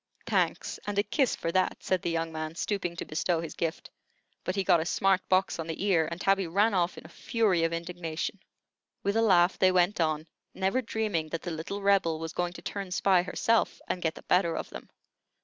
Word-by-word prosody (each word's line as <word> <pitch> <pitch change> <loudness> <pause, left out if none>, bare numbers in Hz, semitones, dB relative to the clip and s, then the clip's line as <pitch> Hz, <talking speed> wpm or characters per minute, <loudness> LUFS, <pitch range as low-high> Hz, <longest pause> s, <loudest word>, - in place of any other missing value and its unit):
"Thanks, - - 0
and 205 -1 -2
a 205 - +4
kiss 265 +2 +1
for 165 - -3
that," 185 +1 0
said 185 -2 0
the - - -2
young 165 0 -1
man, 155 0 -5
stooping 175 -2 -2
to - - -5
bestow 165 +2 0
his 165 -1 -5
gift. 165 0 -3 0.5
But 185 - -2
he 195 - +1
got 175 - +4
a 160 - -2
smart 195 +1 +2
box 185 -1 +2
on 165 - -4
the 165 +3 -4
ear, 170 -6 +3
and 170 +1 -6
Tabby 195 -1 +2
ran 205 +6 +2
off 180 -1 +1
in - - -10
a - - -8
fury 205 -8 +1
of 165 - +1
indignation. 170 +2 -4 0.6
With 200 +1 0
a 225 - +3
laugh 180 -4 +4
they 185 - +5
went 180 +1 +2
on, 155 -1 0 0.3
never 190 +7 +1
dreaming 215 -9 -2
that 165 - -4
the 175 - -4
little 165 +5 -5
Rebel 195 -5 +3
was 165 0 -5
going 175 0 -1
to - - -11
turn 200 -2 -4
spy 185 0 +3
herself, 225 +5 +1
and 180 - -2
get 160 -2 -1
the - - -11
better 175 -3 +2
of - - -5
them. - - -9
180 Hz, 220 wpm, -29 LUFS, 165-195 Hz, 0.6 s, they